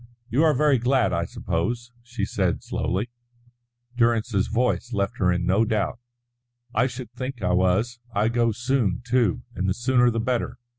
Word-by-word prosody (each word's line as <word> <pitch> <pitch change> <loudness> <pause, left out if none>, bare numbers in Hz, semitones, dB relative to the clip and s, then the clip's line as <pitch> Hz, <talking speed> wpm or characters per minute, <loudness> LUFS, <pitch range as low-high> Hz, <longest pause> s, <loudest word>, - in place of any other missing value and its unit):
"You 140 +7 +3
are 155 -2 +4
very 145 -1 +3
glad, 125 +1 +2
I - - 0
suppose," 120 +9 -3
she 120 +1 -4
said - - -1
slowly. 105 +6 -2 0.8
Durrance's 115 -4 +2
voice 120 +1 0
left 100 -1 -1
her 90 -2 +3
in 90 0 0
no 95 +5 +3
doubt. 110 -1 -1 0.7
"I 125 +4 +3
should 125 -2 -8
think 130 -4 -5
I 90 - +2
was. 95 +7 +1
I 105 0 +1
go 120 -1 +2
soon, 120 -3 0
too, 120 -6 +1
and 95 +1 -1
the 95 - 0
sooner 125 0 +3
the 115 -1 -1
better. 120 +1 -1
120 Hz, 165 wpm, -24 LUFS, 100-125 Hz, 0.8 s, are